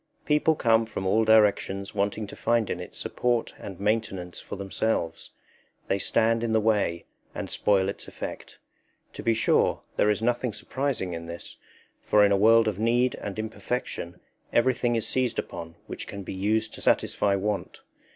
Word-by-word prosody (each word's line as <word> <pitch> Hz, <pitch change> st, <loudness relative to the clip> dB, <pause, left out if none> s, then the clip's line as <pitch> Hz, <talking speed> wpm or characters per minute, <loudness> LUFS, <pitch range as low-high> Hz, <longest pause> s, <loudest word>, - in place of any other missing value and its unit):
People 150 Hz, +1 st, +3 dB
come 115 Hz, -4 st, +3 dB
from 95 Hz, -3 st, -5 dB
all 110 Hz, +4 st, +3 dB
directions 100 Hz, -2 st, +3 dB
wanting 105 Hz, +1 st, -1 dB
to 100 Hz, -, -10 dB
find 115 Hz, -3 st, +1 dB
in 90 Hz, -, -3 dB
it 90 Hz, -, -9 dB
support 120 Hz, -2 st, -1 dB
and 95 Hz, -3 st, -8 dB
maintenance 100 Hz, -4 st, -1 dB
for -, -, -7 dB
themselves; 95 Hz, -3 st, -2 dB, 0.6 s
they 100 Hz, -, +1 dB
stand 115 Hz, +3 st, +2 dB
in 115 Hz, -1 st, 0 dB
the 110 Hz, -, +4 dB
way 105 Hz, -6 st, +1 dB, 0.3 s
and -, -, -5 dB
spoil 95 Hz, -2 st, +2 dB
its 100 Hz, -, -5 dB
effect. -, -, -7 dB, 0.6 s
To -, -, -7 dB
be 115 Hz, -1 st, +2 dB
sure, 115 Hz, -, +2 dB
there 105 Hz, -, +4 dB
is 105 Hz, +1 st, 0 dB
nothing 120 Hz, 0 st, 0 dB
surprising 130 Hz, -10 st, -2 dB
in 85 Hz, 0 st, -6 dB
this, 85 Hz, 0 st, -8 dB, 0.4 s
for 105 Hz, -1 st, +4 dB
in 100 Hz, -, +2 dB
a -, -, +5 dB
world 110 Hz, +3 st, +5 dB
of 105 Hz, -2 st, -1 dB
need 120 Hz, +3 st, +2 dB
and 100 Hz, -1 st, -6 dB
imperfection 110 Hz, -5 st, -4 dB, 0.3 s
everything 120 Hz, 0 st, +2 dB
is 115 Hz, -, -1 dB
seized 125 Hz, -3 st, 0 dB
upon 85 Hz, -1 st, -5 dB
which -, -, -7 dB
can 100 Hz, -1 st, -7 dB
be -, -, -6 dB
used 110 Hz, +4 st, 0 dB
to -, -, -9 dB
satisfy 100 Hz, -1 st, +2 dB
want. 100 Hz, +1 st, -3 dB
105 Hz, 170 wpm, -27 LUFS, 100-115 Hz, 0.6 s, a